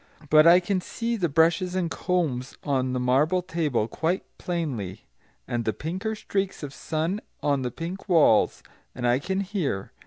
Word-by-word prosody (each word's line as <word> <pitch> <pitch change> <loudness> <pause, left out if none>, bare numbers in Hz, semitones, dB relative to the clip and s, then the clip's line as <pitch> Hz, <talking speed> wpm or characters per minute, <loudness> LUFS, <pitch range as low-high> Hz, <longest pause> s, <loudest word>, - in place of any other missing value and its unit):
But 155 +1 +7
I 175 +2 +8
can 185 +1 -1
see 235 +5 -3
the 180 -6 0
brushes 165 +4 +2
and 175 -3 -1
combs 155 -9 -1
on 130 -3 0
the 125 - 0
marble 145 +9 +2
table 155 - 0
quite 165 +9 -1 0.2
plainly, 125 - -3 0.4
and 120 -1 -1
the 110 - 0
pinker 190 +8 -3
streaks 195 -4 -3
of 140 -1 -6
sun 165 +9 -2 0.2
on 140 -2 +2
the 125 - -1
pink 175 - -7
walls. 155 - +4 0.3
And 125 - -3
I 120 +1 +3
can 190 +6 -1
hear. 180 - -2
165 Hz, 165 wpm, -26 LUFS, 130-185 Hz, 0.4 s, I